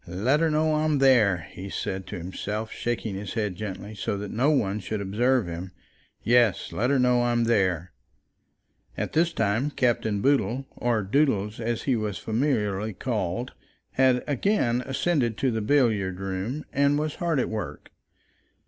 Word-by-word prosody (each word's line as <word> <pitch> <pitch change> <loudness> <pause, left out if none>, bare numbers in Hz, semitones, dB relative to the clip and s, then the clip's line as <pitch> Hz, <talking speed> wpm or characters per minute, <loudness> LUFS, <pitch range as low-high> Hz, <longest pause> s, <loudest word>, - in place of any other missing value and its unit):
"Let 110 - +1
her 165 0 +2
know 155 0 +2
I'm 155 -1 +1
there," 110 - +4
he 95 +2 -8
said 95 -1 -4
to - - -5
himself, 105 +5 -4
shaking 120 -3 -3
his 100 +2 -6
head 105 -5 -1
gently, 100 +1 -6
so 100 0 -3
that 100 0 -5
no 125 +6 +2
one 105 -9 +1
should 105 +2 -4
observe 115 +5 +1
him; 85 +2 -6 0.5
"yes, 120 -5 +3
let 125 +3 0
her 140 - +3
know 125 -1 +3
I'm 120 -1 +2
there." 95 -7 +1 1.1
At - - -3
this 170 +2 +3
time 110 +1 0
Captain 115 -6 0
Boodle, 135 +1 +1
or 120 -3 0
Doodles 105 -2 +1
as 115 0 -2
he 130 - +1
was 105 -3 -2
familiarly 110 -4 -1
called, 110 +2 -2 0.4
had 130 -1 +3
again 140 - +1
ascended 135 -4 0
to 130 - +1
the 110 -1 -1
billiard 105 -7 +2
room 95 +9 -3
and 140 +1 +3
was 150 0 -1
hard 170 -5 0
at - - 0
work. 110 -4 -6
115 Hz, 160 wpm, -26 LUFS, 100-135 Hz, 1.1 s, there